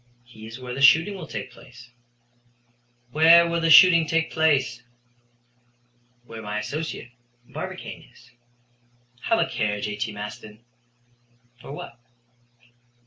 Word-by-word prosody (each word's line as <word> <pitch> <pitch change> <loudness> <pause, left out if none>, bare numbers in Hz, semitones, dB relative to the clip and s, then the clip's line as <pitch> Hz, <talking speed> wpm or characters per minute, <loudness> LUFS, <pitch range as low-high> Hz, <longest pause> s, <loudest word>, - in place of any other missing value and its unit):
"He 110 -3 -14
is 115 +3 -10
where 125 -1 -7
the 135 - -5
shooting 160 +8 +5
will 180 -5 -9
take 130 - -7
place." 125 0 -16 1.2
"Where 165 +3 +6
will 170 0 -2
the 165 - +1
shooting 170 -1 +7
take 165 0 -1
place?" 145 -6 +1 1.4
"Where 115 -1 -10
my 105 0 -5
associate, 140 +2 -6 0.4
Barbicane, - - -8
is." 120 0 -21 0.9
"Have 225 - +2
a - - +1
care, 105 -1 -2
J.T. 105 +2 -4
Maston." 105 +2 -10 1.0
"For - - -11
what?" 125 -4 -10
125 Hz, 120 wpm, -23 LUFS, 110-160 Hz, 1.4 s, shooting